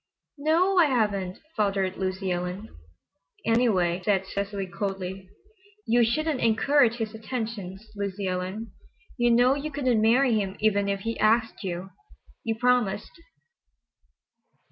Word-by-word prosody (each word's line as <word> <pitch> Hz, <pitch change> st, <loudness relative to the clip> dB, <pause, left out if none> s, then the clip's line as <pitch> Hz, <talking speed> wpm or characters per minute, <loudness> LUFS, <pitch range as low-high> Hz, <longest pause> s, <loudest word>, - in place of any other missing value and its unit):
"No—o—o, 340 Hz, +6 st, +2 dB
I 330 Hz, -, +6 dB
haven't," 205 Hz, -8 st, 0 dB, 0.2 s
faltered 195 Hz, -3 st, 0 dB
Lucy 190 Hz, 0 st, -2 dB
Ellen. 180 Hz, +4 st, -3 dB, 0.8 s
"Anyway," 195 Hz, -7 st, +2 dB
said 195 Hz, -1 st, +1 dB
Cecily 200 Hz, 0 st, -3 dB
coldly, 190 Hz, 0 st, -5 dB, 0.6 s
"you 240 Hz, +1 st, +4 dB
shouldn't 295 Hz, +5 st, 0 dB
encourage 235 Hz, +2 st, +3 dB
his 225 Hz, -2 st, -4 dB
attentions, 220 Hz, -3 st, -5 dB
Lucy 200 Hz, -1 st, -3 dB
Ellen; 185 Hz, +5 st, -3 dB, 0.5 s
you 240 Hz, -1 st, +3 dB
know 245 Hz, +2 st, +5 dB
you 285 Hz, +2 st, -3 dB
couldn't 255 Hz, -6 st, +1 dB
marry 240 Hz, +3 st, +4 dB
him 200 Hz, -3 st, -1 dB
even 205 Hz, -2 st, +2 dB
if 200 Hz, -1 st, -1 dB
he 230 Hz, +2 st, -3 dB
asked 225 Hz, +1 st, +2 dB
you. 185 Hz, 0 st, -4 dB, 0.5 s
You 225 Hz, -1 st, -1 dB
promised." 245 Hz, -4 st, +1 dB
215 Hz, 120 wpm, -26 LUFS, 190-240 Hz, 0.8 s, I